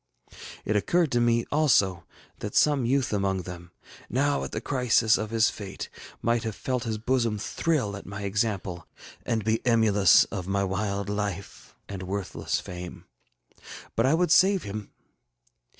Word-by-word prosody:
It 110 - 0
occurred 165 - +2
to 120 - +2
me, 115 0 +2
also, 100 - +3 0.3
that 105 - -6
some 145 -5 +3
youth 135 -2 +1
among 95 -2 0
them, 85 -1 -9 0.4
now 140 +3 +1
at - - -5
the - - -3
crisis 125 -4 +2
of 110 - -3
his 115 0 +3
fate, 100 -3 -7 0.3
might 115 0 +2
have 110 -3 -4
felt 125 -2 -2
his 110 -1 -2
bosom 115 -1 0
thrill 115 -1 -1
at 100 - -10
my 100 +1 -6
example, 100 -4 -2 0.4
and 115 -3 0
be 110 0 +1
emulous 110 -6 +5
of 95 -2 -4
my 100 0 0
wild 100 +1 -2
life 100 -2 -5
and 100 -2 -6
worthless 95 +1 -3
fame. 90 0 -8 0.9
But 115 +3 +2
I 145 - +4
would 175 -1 +1
save 190 0 +5
him. 105 0 -6
110 Hz, 155 wpm, -27 LUFS, 100-120 Hz, 0.9 s, emulous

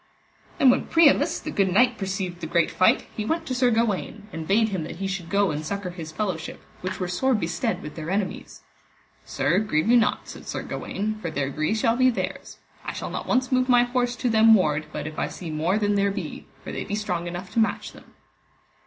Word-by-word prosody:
Then 265 - +6
when - - 0
Priamus 325 -1 +4
the - - -6
good 195 -2 +1
knight 245 +4 +3
perceived 190 -3 -3
the 160 - -4
great 170 0 +2
fight, 185 - +3
he 215 - -2
went 325 +8 -1
to 260 - -3
Sir 250 0 +3
Gawaine, 220 -2 -1
and 160 -1 -5
bade 220 +3 +3
him 190 -5 -2
that - - -7
he 195 +3 -4
should 190 -3 -4
go 200 +1 +2
and 150 +1 -3
succour 200 +2 -4
his 165 -3 -8
fellowship, 180 -3 -3 0.2
which 185 +1 -4
were 180 - -1
sore 255 +9 +1
bestead 190 +4 -2
with 150 - -7
their 160 0 -6
enemies. 195 0 -3 0.6
Sir, - - +1
grieve 210 -5 0
you 245 - +6
not, 230 - +1
said - - -10
Sir - - -4
Gawaine, 215 +2 -4
for 170 - -3
their 140 -3 -2
gree 155 +9 0
shall 225 +1 +2
be 255 0 +5
theirs. 240 - -4 0.3
I - - -4
shall - - -5
not - - -5
once 255 +1 +1
move 255 0 +2
my 245 -1 +6
horse 245 0 0
to 245 +1 -1
them 220 0 +7
ward, 155 -6 +1
but - - -5
if 155 0 -6
I - - 0
see 170 -3 -7
more 165 +6 +1
than 205 -1 +1
there 200 0 +2
be; 195 - -6 0.2
for - - -6
they - - -4
be 205 - -3
strong 180 -5 -2
enough 175 +2 -6
to - - 0
match 220 -2 0
them. - - -17
200 Hz, 230 wpm, -25 LUFS, 175-230 Hz, 0.6 s, them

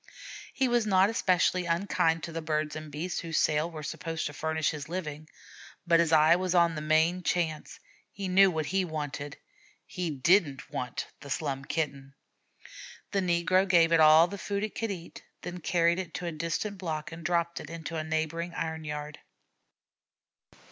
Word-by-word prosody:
He 265 - +1
was 240 -3 +1
not 195 +1 +4
especially 185 -3 +2
unkind 165 -2 +1
to 170 - -5
the 165 0 -4
birds 155 -1 -1
and 155 -1 -7
beasts 165 +5 -3
whose 165 -2 -3
sales 155 +2 +2
were 155 -2 -7
supposed 165 +2 -4
to 145 - -4
furnish 160 +1 -1
his 150 -1 -7
living, 155 -4 -5 0.6
but 170 -1 +4
his 170 -1 +2
eye 160 +1 +6
was 185 0 -1
on 170 -1 +4
the 155 - -5
main 160 +4 +2
chance; 165 -4 -2 0.3
he 195 -1 -5
knew 190 +1 +6
what 160 -3 -2
he 190 +4 0
wanted. 145 -3 -5 0.5
He 180 -2 -4
didn't 145 -2 +2
want 125 -1 -4
the 140 - -11
Slum 135 -1 -2
Kitten. 140 -4 -3 1.0
The 200 - +1
negro 185 +2 +2
gave 170 -2 +5
it 165 - +5
all 155 +1 +8
the 200 +3 -7
food 200 +1 -2
it 215 - -3
could 225 -1 -3
eat, 175 -4 -7 0.2
then 180 0 -6
carried 170 +1 +2
it 185 -3 -6
to 180 - -4
a 170 - -2
distant 170 +6 -3
block 160 -4 -4
and 165 0 -9
dropped 170 0 0
it 150 - -9
in 165 0 -7
a 155 - -2
neighboring 160 +2 -2
iron 160 -1 -3
yard. 150 0 -6
165 Hz, 180 wpm, -29 LUFS, 155-180 Hz, 1.0 s, all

